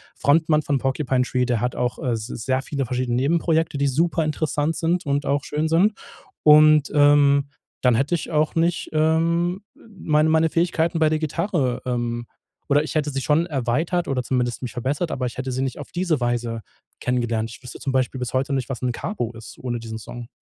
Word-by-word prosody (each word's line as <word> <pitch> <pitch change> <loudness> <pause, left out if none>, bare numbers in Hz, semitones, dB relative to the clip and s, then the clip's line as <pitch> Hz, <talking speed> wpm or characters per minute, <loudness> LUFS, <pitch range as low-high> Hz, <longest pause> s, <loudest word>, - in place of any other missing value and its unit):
Frontmann 155 +1 +3
von 140 -1 0
Porcupine 135 -1 0
Tree, 125 0 0
der 120 -2 0
hat 125 0 -1
auch, 125 0 -2
äh, 130 -6 -1
s 110 -1 -4
sehr 130 +2 -2
viele 140 -2 -3
verschiedene 125 0 -1
Nebenprojekte, 160 +2 +1
die 140 - +2
superinteressant 155 0 0
sind 170 +2 0
und 140 +1 0
auch 140 0 0
schön 150 +2 -1
sind. 175 +7 +3 0.5
Und, 150 -1 +6
ähm, 145 -1 +5 0.3
dann 125 -2 +4
hätte 135 +9 +1
ich 160 - -6
auch 155 0 +1
nicht, 170 +1 +1
ähm, 170 +4 +1 0.4
meine 155 -1 +2
meine 160 0 +3
Fähigkeiten 165 0 +1
bei 155 - +5
der 155 - +1
Gitarre, 155 -5 -1
ähm 120 -1 -2 0.4
oder 145 0 +4
ich 155 - -6
hätte 150 -1 +1
sie 135 -1 -3
schon 155 +4 +2
erweitert 155 +5 -1
oder 130 -2 0
zumindest 125 -1 -1
mich 120 - -4
verbessert, 140 +8 -2
aber 130 -1 -2
ich 120 - -6
hätte 130 0 -3
sie 130 - -2
nicht 130 - -3
auf 145 - -9
diese 175 -4 0
Weise 120 -2 -2 0.4
kennengelernt. 120 -3 -1
Ich 115 - -12
wüsste 125 - -9
zum 135 - -2
Beispiel 130 0 0
bis 125 -2 -4
heute 135 +2 0
nicht, 135 -1 -2
was 125 - -5
'n 125 -1 0
Carbo 120 - -4
ist 115 0 -11
ohne 120 -2 -3
diesen 110 -1 -6
Song. 120 +2 -9
140 Hz, 200 wpm, -23 LUFS, 125-160 Hz, 0.5 s, Und